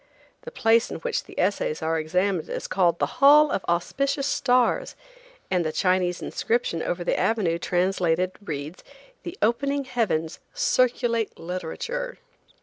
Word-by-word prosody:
The 485 Hz, -, -9 dB
place 230 Hz, -, +3 dB
in -, -, -5 dB
which -, -, -2 dB
the -, -, -9 dB
essays 180 Hz, -5 st, 0 dB
are 160 Hz, 0 st, 0 dB
examined 180 Hz, +2 st, -1 dB
is -, -, -4 dB
called 175 Hz, -3 st, +2 dB
the -, -, -3 dB
Hall 295 Hz, +2 st, +7 dB
of -, -, -1 dB
Auspicious 275 Hz, -, 0 dB
Stars, 275 Hz, -, +1 dB, 0.6 s
and 180 Hz, -2 st, +2 dB
the 155 Hz, -, -2 dB
Chinese 180 Hz, 0 st, 0 dB
inscription 225 Hz, -8 st, -1 dB
over 175 Hz, +1 st, -2 dB
the -, -, 0 dB
avenue 185 Hz, -7 st, +1 dB
translated 180 Hz, 0 st, +1 dB
reads, 150 Hz, -1 st, -6 dB, 0.4 s
"The 345 Hz, -, -8 dB
opening 280 Hz, +6 st, +1 dB
heavens 205 Hz, -11 st, -1 dB, 0.2 s
circulate 245 Hz, -, +1 dB
literature." 185 Hz, -, -5 dB
195 Hz, 140 wpm, -25 LUFS, 170-255 Hz, 0.6 s, Hall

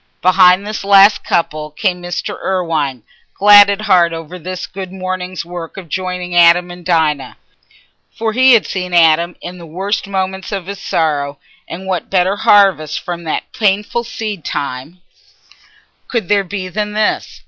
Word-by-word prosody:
Behind 185 Hz, +1 st, +5 dB
this 215 Hz, 0 st, -5 dB
last 200 Hz, +1 st, +5 dB
couple 155 Hz, -2 st, -1 dB
came 180 Hz, +3 st, -2 dB
Mr. 175 Hz, 0 st, -4 dB
Irwine, 160 Hz, -, -2 dB, 0.3 s
glad 205 Hz, 0 st, +7 dB
at 200 Hz, +1 st, -1 dB
heart 180 Hz, -5 st, +3 dB
over 165 Hz, +2 st, -8 dB
this 185 Hz, +2 st, -6 dB
good 190 Hz, -1 st, -8 dB
morning's 185 Hz, -2 st, -5 dB
work 175 Hz, 0 st, -8 dB
of 180 Hz, -4 st, -9 dB
joining 180 Hz, 0 st, -4 dB
Adam 175 Hz, +1 st, +5 dB
and 175 Hz, 0 st, -11 dB
Dinah. 160 Hz, -5 st, 0 dB, 0.7 s
For 225 Hz, -1 st, -3 dB
he 260 Hz, +2 st, +5 dB
had 230 Hz, -, +4 dB
seen 180 Hz, -2 st, -4 dB
Adam 170 Hz, +1 st, +3 dB
in 180 Hz, +1 st, -8 dB
the 170 Hz, -, -10 dB
worst 195 Hz, +6 st, -3 dB
moments 190 Hz, 0 st, -3 dB
of 195 Hz, -4 st, -4 dB
his 200 Hz, +1 st, -7 dB
sorrow; 145 Hz, -5 st, -1 dB, 0.3 s
and 185 Hz, +3 st, -8 dB
what 185 Hz, -4 st, -3 dB
better 190 Hz, +1 st, +1 dB
harvest 190 Hz, -9 st, +3 dB
from 170 Hz, -1 st, -7 dB
that 155 Hz, -, -4 dB
painful 210 Hz, +3 st, 0 dB
seed 215 Hz, -6 st, -6 dB
time 140 Hz, +6 st, -5 dB, 1.1 s
could 225 Hz, -8 st, -3 dB
there 205 Hz, -1 st, +3 dB
be 190 Hz, 0 st, -5 dB
than 210 Hz, +3 st, -4 dB
this? 215 Hz, 0 st, -1 dB
180 Hz, 160 wpm, -15 LUFS, 170-200 Hz, 1.1 s, glad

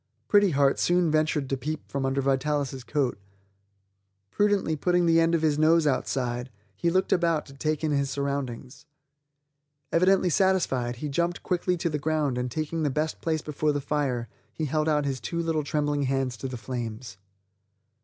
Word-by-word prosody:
Pretty 205 Hz, -1 st, +5 dB
Heart 140 Hz, -3 st, +2 dB
soon 175 Hz, -2 st, +2 dB
ventured 155 Hz, -2 st, +1 dB
to 135 Hz, -, -1 dB
peep 150 Hz, +5 st, -5 dB
from 135 Hz, -1 st, -2 dB
under 135 Hz, +1 st, 0 dB
Vitalis' 135 Hz, -1 st, -1 dB
coat; 135 Hz, -5 st, -1 dB, 1.1 s
prudently 205 Hz, -6 st, +1 dB
putting 175 Hz, +3 st, +2 dB
the 165 Hz, 0 st, +4 dB
end 165 Hz, 0 st, +3 dB
of 160 Hz, -, -1 dB
his 150 Hz, -2 st, +2 dB
nose 160 Hz, +1 st, +4 dB
outside, 125 Hz, -3 st, -1 dB, 0.3 s
he 170 Hz, -, 0 dB
looked 185 Hz, +2 st, +2 dB
about 170 Hz, -3 st, +1 dB
to 135 Hz, -, -13 dB
take 155 Hz, +3 st, -2 dB
in 155 Hz, -, +1 dB
his 140 Hz, -1 st, +1 dB
surroundings. 140 Hz, -2 st, -4 dB, 1.0 s
Evidently 185 Hz, +1 st, +3 dB
satisfied, 145 Hz, -10 st, +1 dB
he 140 Hz, +5 st, -5 dB
jumped 170 Hz, +5 st, -1 dB
quickly 180 Hz, 0 st, 0 dB
to 170 Hz, -, -1 dB
the 150 Hz, -, -1 dB
ground 150 Hz, -3 st, 0 dB
and 125 Hz, 0 st, -2 dB
taking 155 Hz, +4 st, -3 dB
the 150 Hz, -, +1 dB
best 155 Hz, +3 st, -2 dB
place 160 Hz, -2 st, -1 dB
before 150 Hz, 0 st, 0 dB
the 145 Hz, -, -1 dB
fire 135 Hz, -5 st, -1 dB, 0.2 s
he 160 Hz, -, -3 dB
held 155 Hz, +2 st, 0 dB
out 150 Hz, -1 st, +2 dB
his 135 Hz, -2 st, -2 dB
two 120 Hz, +11 st, -4 dB
little 165 Hz, -2 st, 0 dB
trembling 145 Hz, 0 st, 0 dB
hands 135 Hz, -2 st, 0 dB
to 135 Hz, -, -5 dB
the 130 Hz, -1 st, -5 dB
flames. 115 Hz, -2 st, -6 dB
150 Hz, 175 wpm, -26 LUFS, 135-165 Hz, 1.1 s, Pretty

